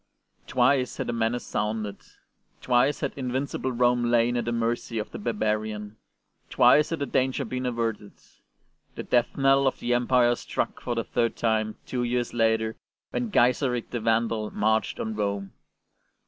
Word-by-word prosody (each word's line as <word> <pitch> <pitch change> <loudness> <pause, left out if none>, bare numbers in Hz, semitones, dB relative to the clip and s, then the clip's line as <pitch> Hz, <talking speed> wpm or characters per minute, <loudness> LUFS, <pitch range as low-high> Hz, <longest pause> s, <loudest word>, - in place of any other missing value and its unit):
Twice 125 +1 +2
had - - -2
the 120 - -2
menace 115 +1 -1
sounded; 105 -1 -2 0.6
twice 125 +3 +2
had - - -2
invincible 130 0 -2
Rome 120 0 +2
lain 120 0 +3
at 120 -2 -1
the 120 - -1
mercy 115 0 -1
of 105 - -4
the - - -7
barbarian; 105 - -2 0.5
twice 150 +1 +5
had 165 - -2
the 140 - -2
danger 130 +1 0
been 125 +2 -3
averted. 115 -4 -3 0.8
The - - -5
death 120 -1 +1
knell 135 0 +4
of 130 - 0
the 120 - 0
Empire 120 0 +3
struck - - -3
for 120 - -2
the 115 - -1
third 115 0 0
time 110 -2 0
two 125 - -3
years 120 0 -1
later 110 -1 +1 0.3
when 245 -2 -2
Gaiseric 125 - +1
the 120 - -2
Vandal 115 -1 0
marched 110 +1 0
on 110 - -3
Rome. 100 -2 -2
120 Hz, 160 wpm, -26 LUFS, 110-125 Hz, 0.8 s, twice